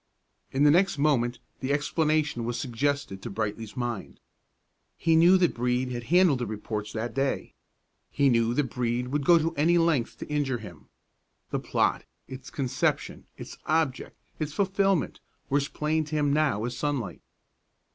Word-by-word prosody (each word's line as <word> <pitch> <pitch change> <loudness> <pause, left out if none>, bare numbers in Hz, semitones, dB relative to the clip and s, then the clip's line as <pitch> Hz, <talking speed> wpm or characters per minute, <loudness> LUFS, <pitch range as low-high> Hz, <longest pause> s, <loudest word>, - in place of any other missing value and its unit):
In 135 +2 +1
the 145 - +7
next 185 +1 +3
moment 125 -5 +2 0.2
the 130 +1 -2
explanation 150 -2 +1
was 120 +1 -2
suggested 135 -5 -2
to - - -6
Brightly's 110 +3 -4
mind. 120 -4 -4 0.8
He 165 -1 +2
knew 175 +4 +7
that 175 -3 +2
Brede 125 +1 -1
had 120 -1 -5
handled 175 -4 +4
the 120 - -2
reports 105 0 -4
that 115 +1 -3
day; 135 0 -1 0.6
he 140 - +2
knew 115 -2 +2
that 130 -4 0
Brede 125 0 -1
would 145 +1 -1
go 170 +3 +6 0.2
any 165 +4 +3
length 165 -8 +1
to - - -7
injure 145 -4 0
him. 90 -9 -12 0.6
The - - 0
plot, - - 0 0.2
its 130 0 -9
conception, 135 -4 -2
its - - -9
object, 155 -4 0 0.2
its 155 -2 -3
fulfilment, 195 -2 +1 0.3
were 140 - +4
as 140 - -2
plain 155 +1 -1
to 155 +1 -5
him 145 -2 +2
now 145 -9 +1
as 120 - -4
sunlight. 135 - -3
140 Hz, 160 wpm, -27 LUFS, 120-155 Hz, 0.8 s, the